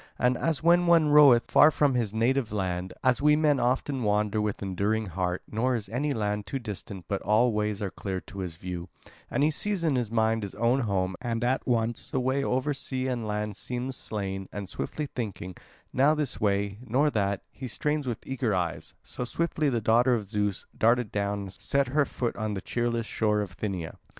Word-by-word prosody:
And 125 0 +2
as 160 +2 -1
when 175 +1 +5
one 165 -3 +5
roveth 145 -5 +6
far 150 - +8
from 145 -2 +2
his 115 -5 0
native 115 +2 +1
land, 95 -3 -2
as 130 0 +3
we 150 +1 +5
men 150 -3 +3
often 130 +2 0
wander 105 0 +1
with 105 -1 -2
enduring 100 +3 0
heart, 90 -1 -2
nor 125 +4 +1
is 110 -4 -4
any 140 +6 -1
land 105 -4 -2
too 135 - -2
distant 100 -6 -7
but 100 - -2
all 110 +4 +3
ways 105 -1 -1
are 95 - -2
clear 95 -2 -4
to 100 - -10
his 90 -4 -4
view, 90 0 -6 0.4
and 140 - +1
he 155 - +4
sees 195 +3 -2
in 155 -5 +2
mind 110 0 +1
his 100 -2 -6
own 115 +5 +2
home, 95 -6 0
and 115 -1 -2
at 130 +2 0
once 115 -1 0
the 130 - -1
way 130 +2 0
over 130 +3 0
sea 130 -1 -3
and 120 -4 -2
land 105 0 -2
seems 125 +4 -4
slain, 95 -4 -4
and 100 -1 -5
swiftly 150 - -4
thinking, 105 -9 -5 0.4
now 140 +4 +4
this 150 -4 -3
way, 100 0 0
now 135 +7 +3
that, 100 -3 0
he 130 - -7
strains 150 +4 -1
with 120 -3 -4
eager 130 -6 -1
eyes; 85 -3 -3
so - - -5
swiftly 155 +3 0
the 120 -3 0
daughter 120 +4 +4
of 105 -4 -4
Zeus 105 -2 -1
darted 115 -1 +2
down 100 0 -1
and 95 -1 -7
set 140 +6 0
her 145 +2 +2
foot 120 -2 -3
on 110 -2 -2
the - - -2
cheerless 120 +1 -1
shore 105 -1 +1
of 100 -3 -3
Thynia. 95 -6 -4
115 Hz, 205 wpm, -27 LUFS, 100-130 Hz, 0.4 s, far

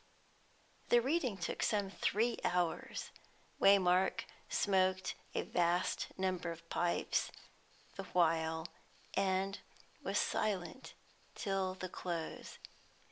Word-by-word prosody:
'" - - -32
The 240 - +7
reading 260 - +1
took 170 - -3
some 205 -4 +1
three 225 +4 +1
hours; 175 -2 -1 0.5
Waymark 190 -1 +5 0.3
smoked 190 -1 +2 0.2
a - - +1
vast 175 +1 +1
number 185 -2 -1
of 165 0 -10
pipes 175 0 +1 0.7
the 195 - -4
while, 160 -2 +2 0.5
and 195 0 +1 0.4
was - - -1
silent 210 +5 -1 0.4
till 195 -3 -1
the 185 0 -4
close. 170 -2 -5
185 Hz, 100 wpm, -36 LUFS, 175-195 Hz, 0.7 s, The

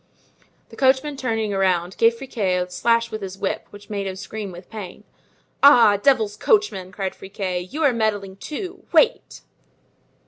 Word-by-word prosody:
The - - -13
coachman 270 +2 +2
turning 225 -5 -2
around, 185 -2 +1
gave 230 0 +4
Friquet 215 -8 -1
a 180 0 -1
slash 230 +4 +1
with 215 -1 -5
his 190 -1 -6
whip 195 - -3
which 205 0 -14
made 200 -2 -3
him 190 - -4
scream 205 +1 -6
with 175 +1 -12
pain. 210 -2 -9 0.6
"Ah! 240 -7 +7
devil's 220 -3 +2
coachman!" 310 - +1
cried 190 0 -4
Friquet, 185 -2 -5
"you're 290 -2 +2
meddling 205 -4 -1
too! 365 - -7
Wait!" 475 - +2
210 Hz, 150 wpm, -22 LUFS, 190-250 Hz, 0.6 s, Ah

